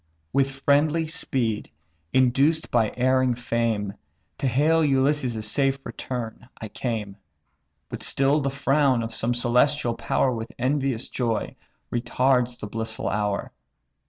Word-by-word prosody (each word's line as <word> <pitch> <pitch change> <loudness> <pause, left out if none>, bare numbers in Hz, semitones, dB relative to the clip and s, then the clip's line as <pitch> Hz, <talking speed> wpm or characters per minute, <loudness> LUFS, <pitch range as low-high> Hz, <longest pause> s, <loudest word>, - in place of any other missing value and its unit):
"With 135 0 +3
friendly 150 +3 +3
speed, 120 -8 -2 0.4
induced 135 +5 +2
by 115 -3 +2
erring 130 0 +3
fame, 115 -4 -1 0.5
To 135 - 0
hail 155 +6 +3
Ulysses' 135 -5 +1
safe 135 +3 +1
return 120 -1 -6
I 110 - -6
came; 105 -5 -4 0.7
But - - -7
still 140 +2 +2
the 140 -1 0
frown 135 -2 +2
of 115 0 -5
some 120 +2 -1
celestial 120 +2 +2
power 130 +2 0
With 115 -1 -6
envious 130 -1 0
joy 115 -4 -2 0.4
retards 125 0 +1
the - - -5
blissful 110 +1 -4
hour. 105 -1 -1
125 Hz, 125 wpm, -25 LUFS, 115-140 Hz, 0.7 s, With